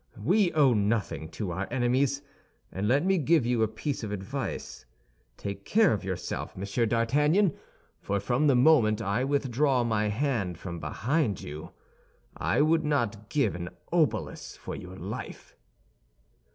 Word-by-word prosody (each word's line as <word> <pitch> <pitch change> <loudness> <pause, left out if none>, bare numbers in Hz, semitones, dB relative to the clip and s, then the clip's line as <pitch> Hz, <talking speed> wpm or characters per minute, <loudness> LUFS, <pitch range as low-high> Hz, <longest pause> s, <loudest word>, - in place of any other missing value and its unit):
We 180 - +2
owe 145 -5 +5
nothing 105 -6 -1
to 100 -5 -4
our 95 +3 -3
enemies; 130 +3 +1 0.5
and 100 +2 -2
let 140 +8 +3
me 190 -1 +3
give 155 -2 +3
you 120 -1 +1
a 110 - +4
piece 120 +5 -4
of 105 - -4
advice; 110 +7 -5 0.5
take 100 0 -6
care 215 - +4
of 100 - -3
yourself, 95 -1 -4
Monsieur 100 +5 0
d'Artagnan, 150 - +3 0.5
for 100 0 -1
from 120 +9 +1
the 140 - +5
moment 125 -5 +5
I 110 +2 0
withdraw 135 -1 +1
my 110 -2 +1
hand 105 - -1
from 85 -1 -6
behind 125 - -1
you, 75 +4 -7 0.7
I - - +1
would 160 +1 +3
not 115 -8 -1
give 145 -2 +1
an 85 0 -5 0.2
obolus 165 -4 0
for - - -7
your 90 +1 -9
life." - - -7
120 Hz, 150 wpm, -28 LUFS, 100-145 Hz, 0.7 s, owe